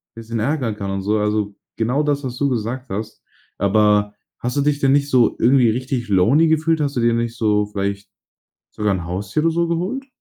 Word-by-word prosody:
bisschen 115 0 -5
ärgern 125 -2 -1
kann 100 -2 -4
und 95 0 -2
so“, 105 +3 0
also, 105 -1 -1 0.2
genau 125 +6 +1
das, 145 -1 0
was 125 -2 -5
du 140 +1 +1
gesagt 125 +2 -3
hast. 105 +2 -5 0.4
Aber 105 0 +2 0.3
hast 125 +3 -3
du - - +3
dich 145 0 +1
denn 135 -2 +3
nicht 140 0 +2
so 125 -4 +3
irgendwie 125 -1 +4
richtig 125 0 -2
lonely 115 - +4
gefühlt? 160 0 +1
Hast 145 -1 -1
du - - +1
dir 115 0 +3
nicht 115 0 -2
so, 105 -2 +2
vielleicht 100 -1 -4 0.6
sogar 105 -2 -1
'n 90 -3 -4
Haustier 95 - -2
oder 165 +1 +2
so 170 +1 0
geholt? 190 +12 -2
115 Hz, 205 wpm, -20 LUFS, 105-140 Hz, 0.6 s, irgendwie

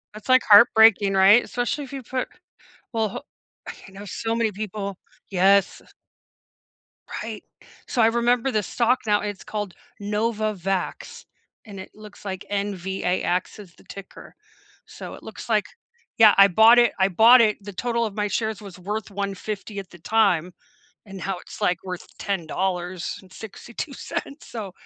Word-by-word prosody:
It's 215 +4 -12
like 255 0 +6
heartbreaking, 210 -2 +7
right? 195 +5 +6
Especially 245 +4 -3
if 275 - -11
you 270 -2 -6
put 255 +2 -3 0.7
well, 220 -2 0
ho - - -7 0.5
okay - - -11
I - - -18
know 200 +2 -10
so 225 +4 -3
many 225 -2 0
people 200 -1 -5 0.3
yes. 195 +1 +3 1.4
Right, - - -7 0.4
so 240 - 0
I 220 - +6
remember 240 +2 +1
the 215 -3 0
stock 245 +6 +1
now, 210 -1 +2
it's 205 -2 -5
called 205 -4 -5 0.3
Novavax, 210 -3 -3 0.4
and 200 -3 -10
it 190 - -10
looks 210 -1 -14
like 190 -1 -5
N-V-A-X 190 -1 -2
is 185 -4 -13
the - - -21
ticker, 195 -1 -12 0.5
so, - - -9
it - - -15
looks - - -10
like - - +2 0.5
yeah, 220 -2 +8
I 195 0 +8
bought 220 +6 +6
it 240 - +4
I 190 - +4
bought 230 +6 +7
it 215 -2 +2
the 205 -1 -8
total 235 +2 -1
of 210 -1 -6
my 210 -1 -1
shares 220 0 -2
was 195 -3 -11
worth 210 +3 -4
$150 200 +1 -5
at - - -37
the 175 - -14
time, 180 -3 +1 0.5
and 195 -1 -9
now 185 0 -4
it's, - - -12
like, 180 -1 +1
worth 180 -2 -6
$10.62 190 - -5
so, 210 -6 -7
205 Hz, 155 wpm, -23 LUFS, 190-225 Hz, 1.4 s, yeah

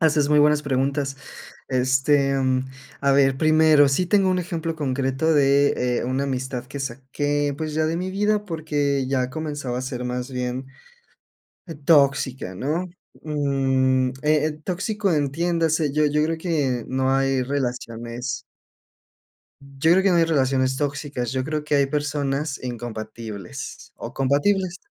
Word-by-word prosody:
Haces 150 -3 +3
muy 150 - +5
buenas 150 0 +4
preguntas. 135 0 -1 0.5
Este, 135 +2 +2
mm, 130 -1 +1 0.4
a 140 0 +3
ver, 135 -1 +4
primero, 155 -1 +5
sí 160 +7 +1
tengo 195 0 +3
un 185 - +1
ejemplo 165 -2 -3
concreto 135 +1 0
de, 140 -3 +3
eh, - - -2
una 130 +3 -1
amistad 130 -2 -3
que 140 +2 -7
saqué, 140 +3 -2
pues, 155 0 -4
ya 155 0 +1
de 160 +1 -1
mi 185 +1 -3
vida, 210 +2 +1
porque 145 -5 -1
ya 130 -2 0
comenzaba 145 -4 -4
a - - -3
ser 125 -1 -4
más 125 +1 -3
bien 125 +1 -3 1.0
e 165 - -7
tóxica, 140 - +2
¿no? 155 - -2 0.3
Mm, 135 -3 +1
eh 150 0 +3
eh, 155 0 -5
tóxico, 200 +2 -1
entiéndase, 160 +1 +1
yo 150 +1 +3
yo 150 +1 +2
creo 160 +1 -1
que 145 -9 -1
no 130 0 0
hay 135 -1 +1
relaciones 125 -2 -3 1.2
yo 140 +2 -1
creo 190 +2 +5
que 195 - +4
no 175 - +4
hay 165 - +5
relaciones 130 -4 +1
tóxicas, 140 -4 -3
yo 130 -1 -1
creo 155 +1 -3
que 150 - -3
hay 140 -1 +3
personas 145 0 -2
incompatibles, 110 -4 -7
o, - - -8
compatibles. 175 +7 +1
140 Hz, 150 wpm, -23 LUFS, 130-155 Hz, 1.2 s, muy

